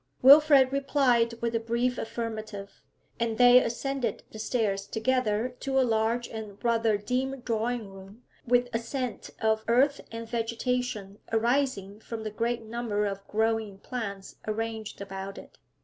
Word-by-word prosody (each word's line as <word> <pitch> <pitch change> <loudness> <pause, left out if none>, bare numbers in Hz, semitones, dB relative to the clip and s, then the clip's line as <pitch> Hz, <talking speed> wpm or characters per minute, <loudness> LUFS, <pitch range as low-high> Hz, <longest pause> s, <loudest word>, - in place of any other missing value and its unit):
Wilfrid 280 -1 +8
replied 255 -4 +2
with 235 0 0
a 230 - +1
brief 235 +2 -1
affirmative, 220 -3 -5 0.4
and 230 -1 -1
they 245 0 +8
ascended 245 -1 -2
the 215 - -9
stairs 210 -4 -1
together 230 -1 0
to 270 -1 0
a 260 - +4
large 230 +1 +1
and 215 -3 -8
rather 230 -2 +2
dim 255 +5 -2
drawing 230 -1 -1
room, 195 +4 -13 0.2
with 245 +1 +3
a 230 - +1
scent 250 0 -4
of 220 0 +2
earth 270 +5 +3
and 230 0 -6
vegetation 230 -3 -2
arising 225 -4 0
from 225 0 -7
the 215 - -4
great 230 +2 -1
number 220 -2 -2
of 195 -1 -2
growing 220 -2 0
plants 200 -3 -6
arranged 220 -1 -4
about 195 0 -6
it. - - -13
230 Hz, 145 wpm, -28 LUFS, 215-245 Hz, 0.4 s, Wilfrid